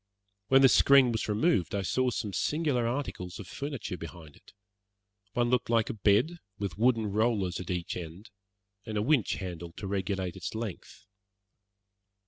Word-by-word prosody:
When 135 0 +5
this 135 - +7
screen 135 -3 +6
was 110 -1 -2
removed 105 - +1
I 100 - -1
saw 130 +7 +1
some 105 -4 -3
singular 145 - 0
articles 115 -9 -4
of 100 - -9
furniture 140 -9 -5
behind 80 -2 -10
it. - - -19 0.8
One 120 0 +1
looked 125 -2 +1
like 115 -2 +2
a - - -5
bed 110 - +2 0.2
with 100 -5 -4
wooden 115 -2 +3
rollers 105 -5 +1
at 90 - -7
each 90 -2 -2
end, 90 +5 -8 0.5
and 110 -2 -4
a 105 - +1
winch 130 -3 +2
handle 85 -3 -6
to 100 - -8
regulate 95 -1 -2
its 95 +3 -6
length. 110 -1 -7
105 Hz, 160 wpm, -29 LUFS, 90-125 Hz, 0.8 s, this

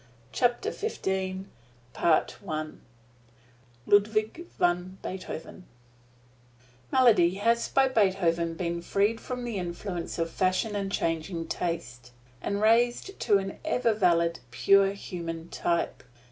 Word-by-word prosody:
[Illustration: 195 - -1 0.5
BEETHOVEN] 155 -1 0 1.0
LUDWIG 215 +10 +2
VAN 180 +2 0
BEETHOVEN 185 -1 -7 1.3
Melody 215 -9 +5
has 230 +4 +1
by 270 0 +4
Beethoven 185 -8 +1
been 170 0 -2
freed 205 +5 +1
from 250 -1 -5
the 235 -5 -3
influence 175 0 -5
of 165 -1 -1
Fashion 185 +3 0
and 195 -1 -2
changing 165 -1 -2
Taste, 125 -8 -4 0.3
and 200 +1 -2
raised 240 - +2
to 210 -4 +4
an 195 0 -5
ever 250 -7 +1
valid, 170 -4 +2
purely 195 +10 +4
human 170 -4 -6
type. 170 -1 -1
190 Hz, 105 wpm, -28 LUFS, 170-220 Hz, 1.3 s, Melody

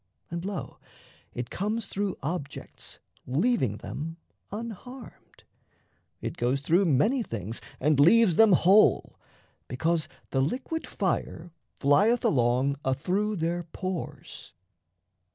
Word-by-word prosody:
And, 170 0 -4
lo, 190 -7 -5 0.5
It 125 -1 -6
comes 215 +3 -2
through 195 -1 -3
objects 145 -2 -5 0.3
leaving 135 - +1
them 165 +8 -6 0.3
unharmed, 235 +3 -9 0.8
It - - -5
goes 125 +3 0
through 175 +7 +3
many 205 - +3
things 115 - -5 0.2
and 145 +1 +2
leaves 180 +4 +6
them 220 0 +6
whole, 195 +5 +4 0.5
Because 160 +6 0 0.2
the 135 - +2
liquid 260 - -2
fire 170 +1 -2 0.3
flieth 205 - +4
along 130 +2 +2
Athrough 180 +11 0
their 170 0 -1
pores. 175 +1 -6
170 Hz, 105 wpm, -27 LUFS, 140-210 Hz, 0.8 s, leaves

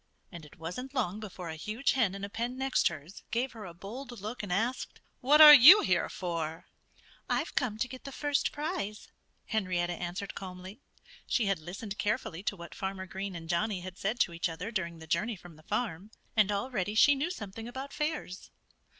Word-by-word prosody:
And 170 -4 -9
it - - -18
wasn't 250 - -6
long 210 -6 -1
before 185 -5 -7
a 160 - -5
huge 215 - -1
hen 225 -8 +1
in 200 - -7
a - - -2
pen 240 +4 -3
next 265 0 +2
hers 160 +3 -7
gave 245 +3 -1
her 220 -4 -9
a 175 - -8
bold 240 +6 -8
look 215 +5 -5
and 205 -3 -6
asked, 230 +8 -1 0.2
"What 295 +4 +5
are 300 -1 +13
you 300 - +11
here 185 - +1
for?" 165 -3 -4 0.6
"I've - - 0
come 225 -5 0
to 240 - -1
get 255 +1 -10
the 275 - -7
first 290 +1 0
prize," 290 - -4 0.4
Henrietta 180 -5 -1
answered 180 +3 -5
calmly. 185 +4 -9 0.5
She 235 - +1
had 195 -3 +1
listened 195 +6 -7
carefully 205 -4 -1
to 205 - -2
what 170 -2 -10
Farmer 190 -1 -4
Green 190 0 -5
and 165 -1 -7
Johnnie 185 +3 0
had 185 +1 -9
said 215 +5 -1
to 170 - +2
each 170 +1 -1
other 175 +7 -5
during 170 -6 -3
the 160 - -11
journey 170 +9 0
from 175 -3 -14
the 155 - -17
farm. 200 +1 -3 0.3
And 210 -2 +4
already 205 -1 -2
she 290 +6 +7
knew 285 +5 -1
something 225 - -7
about 265 +3 -7
fairs. 300 - -3
200 Hz, 200 wpm, -30 LUFS, 180-245 Hz, 0.6 s, are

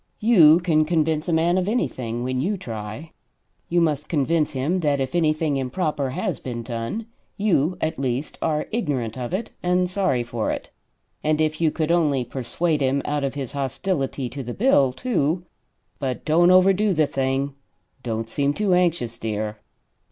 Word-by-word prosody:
You 175 -8 +7
can 165 -3 +2
convince 160 0 0
a - - +1
man 170 +3 +3
of 185 - -2
anything, 120 - -2
when 130 0 -1
you 200 +7 0
try. 110 - -7 0.6
You 175 - +2
must 150 -3 0
convince 155 0 +1
him 145 +8 0
that 145 -4 +1
if 135 +3 -2
anything 155 -3 +1
improper 140 +1 -1
has 180 - -2
been 120 -2 -5
done, 115 - -4 0.3
you 180 -5 +1
at 160 -3 -2
least 130 +2 -2
are 150 -2 0
ignorant 140 - -2
of 125 -2 -5
it 200 +5 -3
and 180 0 +2
sorry 180 -10 +1
for 120 -2 -3
it. - - -4 0.5
And 155 0 +1
if 155 0 0
you 160 - +4
could 155 +1 -1
only 150 -7 +2
persuade 145 +6 -1
him 135 +1 +1
out 145 -1 -1
of 140 0 -2
his 135 -4 -4
hostility 140 0 -2
to 135 +4 -6
the 120 -1 -6
bill, 190 - +4
too 170 - -1 0.5
but 130 -3 -3
don't 170 +3 +4
overdo 190 +2 +5
the 155 -1 +4
thing; 135 0 -1 0.5
don't 115 -2 -3
seem 140 +5 0
too 205 -3 +1
anxious, 165 -10 +1
dear." 110 -1 -3
150 Hz, 170 wpm, -23 LUFS, 130-175 Hz, 0.6 s, You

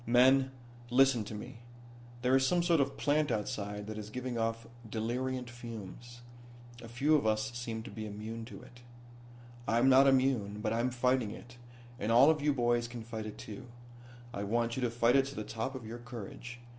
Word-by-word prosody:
"Men, 130 +2 +5 0.4
listen 130 -2 +4
to 110 - -6
me. 120 +3 -8 0.6
There 125 +1 +4
is 135 0 +4
some 175 +2 +2
sort 170 -2 +3
of 140 0 -1
plant 150 +1 +2
outside 105 -2 -3
that 110 0 -6
is 105 0 -7
giving 125 +2 -4
off 115 0 -1 0.2
deliriant 125 +3 -2
fumes. 120 0 -9 0.6
A 115 - -9
few 135 +7 +1
of 140 -7 +2
us 110 +1 +1
seem 115 -2 -4
to - - -9
be 110 +1 -6
immune 110 +2 -6
to 120 - -10
it. 120 0 -15 0.9
"I'm 120 +5 +4
not 135 +1 +7
immune, 130 -6 +2
but 110 +1 -1
I'm 120 +2 +1
fighting 125 -2 +1
it, 120 +3 -11 0.4
and 110 - -1
all 130 +6 +7
of 155 -2 -1
you 150 +1 +3
boys 120 -3 +1
can 120 -1 -7
fight 110 -1 -5
it 105 - -8
too. 120 +4 -9 0.7
I 100 - -3
want 115 +3 0
you 130 - -3
to 125 - +1
fight 115 +1 +3
it 135 -1 +5
to 140 - -8
the 110 - -3
top 115 +5 -4
of 125 -3 -7
your 115 +2 -7
courage. 120 +1 -8
120 Hz, 195 wpm, -32 LUFS, 110-130 Hz, 0.9 s, not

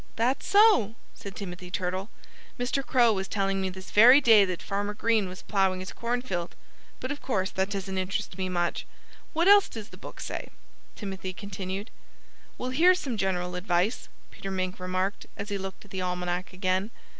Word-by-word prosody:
"That's 245 +4 0
so!" 400 - +5 0.2
said 200 -1 -9
Timothy 180 -2 -7
Turtle. 185 +3 -2 0.5
"Mr. 255 +3 0
Crow 240 -4 +4
was 190 -1 -2
telling 195 -1 0
me 190 - -1
this 185 0 -10
very 245 +6 +9
day 225 -7 +7
that 185 -2 -3
Farmer 205 +1 -2
Green 220 -3 +1
was 185 - -10
ploughing 190 -2 +1
his 185 +1 -7
cornfield; 235 -8 -3 0.4
but 255 - -4
of 290 - -5
course 195 -7 -1
that 190 +1 0
doesn't 195 -1 -3
interest 190 +1 -3
me 185 0 -2
much.... 175 -1 -1 0.5
What 335 +3 +2
else 405 0 +7
does 220 -2 -8
the - - -13
book - - -10
say?" - - -5 0.5
Timothy 190 -2 -5
continued. 195 +1 -6 0.7
"Well, 250 +1 -3
here's 355 +7 +5
some 265 -9 -3
general 180 -3 -1
advice," 180 +4 0 0.2
Peter 195 - -7
Mink 185 -1 -2
remarked, 185 +2 -2
as 200 +1 -5
he 200 -1 -2
looked 190 +1 -7
at 205 - -18
the 190 - -3
Almanac 180 0 -2
again. 185 +2 0
195 Hz, 180 wpm, -28 LUFS, 185-225 Hz, 0.7 s, very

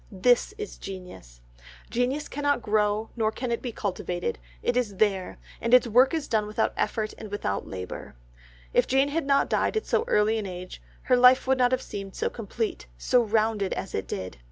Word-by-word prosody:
This 240 - +3
is 425 -1 -7
genius. 180 - -9 0.5
Genius 255 +5 0
cannot 285 -4 0
grow 210 +1 +1
nor 220 -2 +1
can 245 +1 -4
it 235 - -1
be 245 - -4
cultivated, 180 - -3 0.2
it - - +1
is 235 -5 0
there, 195 -2 0 0.2
and 235 +2 +5
its 250 - +5
work 245 +3 +5
is 315 -3 -3
done 215 -2 +1
without 215 +1 0
effort 215 -1 -1
and 215 - -8
without 195 - -3
labour. 90 -7 -7 0.6
If - - +3
Jane 270 +2 +3
had 305 0 -2
not 275 0 +3
died - - +1
at 435 - -1
so - - +1
early 215 - +3
an 205 - -4
age, 180 0 -8 0.2
her 255 - +3
life 250 +1 +6
would 265 0 +2
not 250 0 +4
have 255 0 0
seemed 195 -1 -7
so - - -1
complete, 220 - -4
so 245 - +3
rounded 215 -2 +1
as 195 - -5
it 95 - -3
did. 95 -6 -5
220 Hz, 195 wpm, -26 LUFS, 195-250 Hz, 0.6 s, life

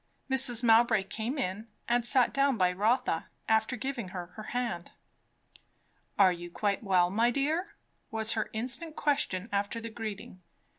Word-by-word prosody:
Mrs. 260 -3 +3
Mowbray 225 -2 +5
came 230 +8 -4
in 215 -2 -3 0.2
and 240 0 +2
sat 250 +1 +3
down 275 -2 +2
by 180 -2 +3
Rotha, 215 -2 +1 0.2
after 220 +2 +2
giving 260 -5 -4
her 180 -1 -6
her 215 - -9
hand. 175 -9 -3 1.3
"Are 190 -2 +6
you 175 0 -8
quite 200 +2 -1
well, 180 -3 +3
my 230 +4 +3
dear?" 310 - -1 0.3
was 220 0 0
her 220 - -2
instant 255 +8 -3
question 215 -10 0
after 205 +3 -1
the 230 0 -7
greeting. 210 -4 -7
225 Hz, 150 wpm, -30 LUFS, 200-250 Hz, 1.3 s, Are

